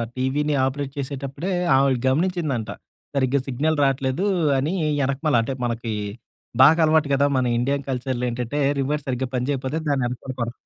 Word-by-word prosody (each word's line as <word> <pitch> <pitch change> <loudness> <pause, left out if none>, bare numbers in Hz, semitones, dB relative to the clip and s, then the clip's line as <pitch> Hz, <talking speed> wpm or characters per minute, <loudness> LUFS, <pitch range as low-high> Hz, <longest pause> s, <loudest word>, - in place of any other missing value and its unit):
టీవీని 145 +3 0
ఆపరేట్ 135 +1 -3
చేసేటప్పుడే, 140 +5 -4 0.2
ఆమె 135 -1 +3
గమనించిందంట. 150 -6 0 0.5
సరిగ్గా 135 0 +2
సిగ్నల్ 150 +5 0
రాట్లేదు 135 +6 0 0.3
అని 150 +7 0 0.3
ఎనకమాల 140 +1 0
అంటే, 130 +4 -3
మనకి, 115 -1 -3 0.7
బాగా 160 +5 +6
అలవాటు 155 -2 +3
కదా! 140 +1 +3
మన 130 - +1
ఇండియన్ 140 +3 -1
కల్చర్‌లో 125 -1 -2
ఏంటంటే, 125 +4 -3 0.2
రివర్ 145 +2 -1
సరిగ్గా 130 0 -2
పని 125 +1 -1
చేయిపోతే 135 +3 -2
దాన్ని 135 -3 +1
వెనకాల 125 +2 -6
కొడతా 120 +1 -5
135 Hz, 145 wpm, -23 LUFS, 130-145 Hz, 0.7 s, బాగా